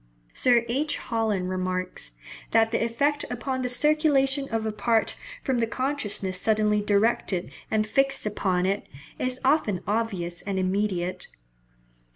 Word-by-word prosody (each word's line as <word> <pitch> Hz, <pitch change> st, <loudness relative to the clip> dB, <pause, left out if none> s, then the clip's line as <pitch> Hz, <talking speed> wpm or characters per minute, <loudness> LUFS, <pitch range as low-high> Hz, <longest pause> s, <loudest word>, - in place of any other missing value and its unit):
Sir 240 Hz, -2 st, +3 dB
H. 285 Hz, +6 st, 0 dB
Holland 220 Hz, -6 st, -1 dB
remarks, 185 Hz, 0 st, -3 dB, 0.4 s
that 225 Hz, 0 st, +3 dB
"the 230 Hz, -, +1 dB
effect 285 Hz, +6 st, +1 dB
upon 260 Hz, +2 st, -3 dB
the 250 Hz, -, -1 dB
circulation 280 Hz, 0 st, +2 dB
of 225 Hz, -1 st, -1 dB
a 220 Hz, -, 0 dB
part 225 Hz, +1 st, +1 dB, 0.3 s
from 260 Hz, -3 st, 0 dB
the 230 Hz, -, +1 dB
consciousness 210 Hz, -6 st, -2 dB
suddenly 215 Hz, -1 st, +2 dB
directed 205 Hz, -3 st, +1 dB, 0.2 s
and 215 Hz, -1 st, +1 dB
fixed 270 Hz, +4 st, +1 dB
upon 190 Hz, -3 st, 0 dB
it, 195 Hz, +2 st, -1 dB, 0.3 s
is 255 Hz, 0 st, 0 dB
often 240 Hz, -, +2 dB
obvious 195 Hz, -5 st, -1 dB
and 200 Hz, -1 st, -3 dB
immediate." 185 Hz, -1 st, -1 dB
225 Hz, 135 wpm, -26 LUFS, 195-255 Hz, 0.4 s, Sir